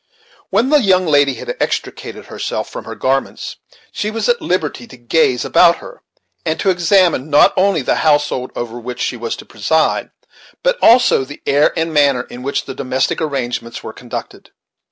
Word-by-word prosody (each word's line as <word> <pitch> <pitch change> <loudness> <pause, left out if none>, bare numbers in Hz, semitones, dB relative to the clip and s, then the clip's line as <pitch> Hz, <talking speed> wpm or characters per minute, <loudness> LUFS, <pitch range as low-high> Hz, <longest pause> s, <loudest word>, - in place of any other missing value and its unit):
When 220 +6 +2
the 300 -1 +5
young 185 -4 +3
lady 145 -4 +3
had - - -6
extricated - - -3
herself - - -4
from - - -8
her - - -7
garments, 135 +1 -2 0.3
she 210 - -3
was 220 -1 -2
at 240 -1 +1
liberty 150 -9 -2
to 130 - -14
gaze 125 0 +1
about 170 -1 +5
her, - - -12 0.4
and 160 -1 -2
to 195 - +2
examine 175 -5 +2
not 145 - +5
only 185 -6 +2
the - - +1
household 145 -4 +1
over 120 0 -5
which 125 +1 -7
she 125 - -1
was 115 -1 -4
to - - -11
preside, 135 +10 0 0.5
but - - +1
also 240 - +5
the 145 +2 -11
air 145 +2 +3
and 160 0 -1
manner 140 -4 +3
in 125 - -8
which 140 +2 -2
the 135 - -6
domestic 130 +2 -1
arrangements 120 -6 -3
were - - -7
conducted. - - -8
145 Hz, 175 wpm, -17 LUFS, 125-185 Hz, 0.5 s, the